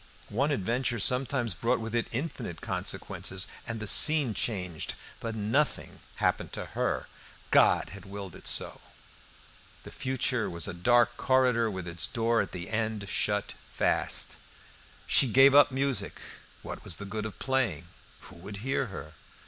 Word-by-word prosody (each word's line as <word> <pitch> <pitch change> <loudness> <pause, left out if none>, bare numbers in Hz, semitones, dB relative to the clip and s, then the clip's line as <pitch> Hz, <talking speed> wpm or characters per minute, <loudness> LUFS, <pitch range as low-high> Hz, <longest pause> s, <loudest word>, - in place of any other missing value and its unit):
One 135 +8 +1
adventure 120 -1 0
sometimes 125 0 +1
brought 115 +8 0
with 115 0 -5
it 120 -1 0
infinite 120 - -4
consequences 95 0 -3 0.2
and 115 -1 -4
the 105 - -5
scene 145 +2 +5
changed. 90 -8 -3 0.2
But 115 -1 -4
nothing 115 +8 0 0.2
happened - - 0
to - - -4
her; - - -1 0.4
God - - +4
had 100 +2 -11
willed 100 -2 -7
it - - -7
so! - - +2 1.0
The - - -10
future 130 -2 0
was 85 +2 -1
a 100 - -4
dark 120 +7 +3
corridor, 125 -3 +3
with 95 -3 -5
its 85 -1 0
door 115 -2 +1
at 100 - -5
the 90 +3 -6
end 110 -2 -2
shut 105 0 -1 0.2
fast. - - -1 0.7
She 135 - +5
gave 135 +4 +6
up 145 0 +7
music. 135 -3 0 0.4
What - - -7
was 85 - 0
the 100 - -6
good 105 +2 -4
of 105 - -11
playing? 120 - -1 0.3
Who 95 - -13
would 100 +4 -8
hear 135 -1 0
her? 80 -7 -9
115 Hz, 155 wpm, -29 LUFS, 100-130 Hz, 1.0 s, up